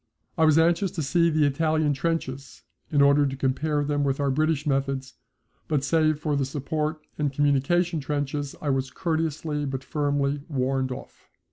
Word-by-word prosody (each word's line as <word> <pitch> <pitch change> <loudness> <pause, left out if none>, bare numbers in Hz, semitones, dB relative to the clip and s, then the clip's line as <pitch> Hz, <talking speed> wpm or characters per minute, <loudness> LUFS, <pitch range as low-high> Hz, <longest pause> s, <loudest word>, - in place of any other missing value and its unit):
I 160 - +3
was 155 -1 +5
anxious 170 +4 +3
to 160 - -2
see 170 +4 +3
the 155 -2 +2
Italian 155 +1 +1
trenches, 140 -3 -3 0.3
in 145 -2 +4
order 140 0 +5
to 135 - -3
compare 140 +3 0
them 145 0 0
with 135 0 0
our 140 -1 +1
British 155 +1 +1
methods, 135 -1 -1 0.5
but 150 -3 0
save 155 +1 +2
for 150 -1 -1
the 140 - +1
support 150 +3 -3
and 145 -2 +1
communication 145 +5 +1
trenches 145 0 -3
I 145 - +1
was 135 0 -1
courteously 155 -2 -2
but 135 -1 -4
firmly 145 -1 -1
warned 130 -2 0
off. 125 - -10
145 Hz, 165 wpm, -25 LUFS, 135-155 Hz, 0.5 s, was